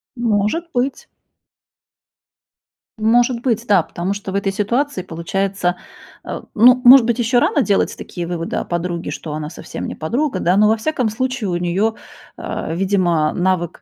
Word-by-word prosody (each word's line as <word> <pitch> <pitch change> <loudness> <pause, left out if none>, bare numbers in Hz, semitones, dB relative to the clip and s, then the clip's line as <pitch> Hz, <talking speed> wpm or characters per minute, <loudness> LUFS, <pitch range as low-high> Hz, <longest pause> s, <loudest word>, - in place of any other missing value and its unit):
Может 235 +8 0
быть. 255 +3 -2 1.9
Может 235 +2 +2
быть, 235 -2 -1
да. 200 -3 +5
Потому 175 +5 -3
что 200 -1 -6
в 195 - -5
этой 200 0 0
ситуации 235 +5 -1
получается, 180 +1 -2 0.5
э, - - -6
ну, 250 +3 +6
может 255 -1 +9
быть, 235 -1 0
ещё 240 +1 +2
рано 305 - +2
делать 200 -3 +1
такие 175 -2 -6
выводы 170 -1 -3
о - - -2
подруге, 175 0 -3
что 155 - -6
она 150 0 -4
совсем 170 - -7
не - - -6
подруга, 255 - -1
да, 180 +3 +2
но, 210 +1 +5
во 220 - +3
всяком 250 -1 -1
случае, 255 -2 -2
у 175 - -1
неё, 185 +6 0 0.4
э, 160 - -4
видимо, 175 -4 +1
навык 180 -2 -1
205 Hz, 160 wpm, -19 LUFS, 175-240 Hz, 1.9 s, может